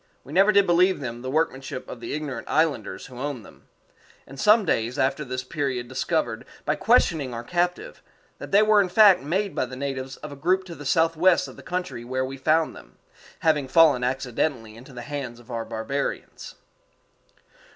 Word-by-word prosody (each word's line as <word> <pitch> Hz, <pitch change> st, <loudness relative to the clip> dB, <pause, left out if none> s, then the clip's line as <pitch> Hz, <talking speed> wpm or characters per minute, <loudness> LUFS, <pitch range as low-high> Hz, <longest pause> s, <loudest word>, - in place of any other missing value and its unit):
We 140 Hz, -, -11 dB
never 195 Hz, +4 st, +5 dB
did 200 Hz, -1 st, +4 dB
believe 180 Hz, +2 st, +3 dB
them 120 Hz, -3 st, -6 dB
the 130 Hz, -, -5 dB
workmanship 135 Hz, -3 st, -2 dB
of 120 Hz, -, -8 dB
the 120 Hz, -, -5 dB
ignorant 145 Hz, -5 st, -5 dB
islanders 150 Hz, -9 st, 0 dB
who 125 Hz, -2 st, -11 dB
owned 140 Hz, -5 st, -4 dB
them; -, -, -18 dB, 0.6 s
and 135 Hz, 0 st, -12 dB
some 210 Hz, +5 st, +5 dB
days 115 Hz, -3 st, 0 dB
after 135 Hz, +3 st, 0 dB
this 130 Hz, -1 st, -4 dB
period 130 Hz, -3 st, -3 dB
discovered, 130 Hz, -2 st, -2 dB, 0.2 s
by 150 Hz, -, +2 dB
questioning 160 Hz, -, +2 dB
our 115 Hz, -, -5 dB
captive, 175 Hz, +5 st, -2 dB, 0.4 s
that -, -, -8 dB
they 205 Hz, +2 st, +6 dB
were 215 Hz, -1 st, +5 dB
in 190 Hz, -, -1 dB
fact 205 Hz, 0 st, +6 dB
made 190 Hz, +8 st, -1 dB
by 130 Hz, -, -1 dB
the 130 Hz, -, -8 dB
natives 135 Hz, -1 st, -5 dB
of 150 Hz, -, -9 dB
a -, -, -8 dB
group 180 Hz, +7 st, +1 dB
to 180 Hz, -2 st, -9 dB
the 145 Hz, -4 st, -8 dB
southwest 165 Hz, +4 st, +3 dB
of -, -, -11 dB
the -, -, -12 dB
country 180 Hz, -9 st, -4 dB
where 130 Hz, +2 st, -2 dB
we 135 Hz, +1 st, -6 dB
found 155 Hz, +3 st, +1 dB
them, -, -, -15 dB, 0.4 s
having 150 Hz, -4 st, +2 dB
fallen 145 Hz, -3 st, +5 dB
accidentally 125 Hz, -2 st, -2 dB
into 125 Hz, +5 st, -13 dB
the 120 Hz, -2 st, -8 dB
hands 135 Hz, -4 st, -6 dB
of 120 Hz, +1 st, -14 dB
our 115 Hz, -1 st, -3 dB
barbarians. 115 Hz, +6 st, -4 dB
140 Hz, 190 wpm, -24 LUFS, 125-170 Hz, 0.6 s, they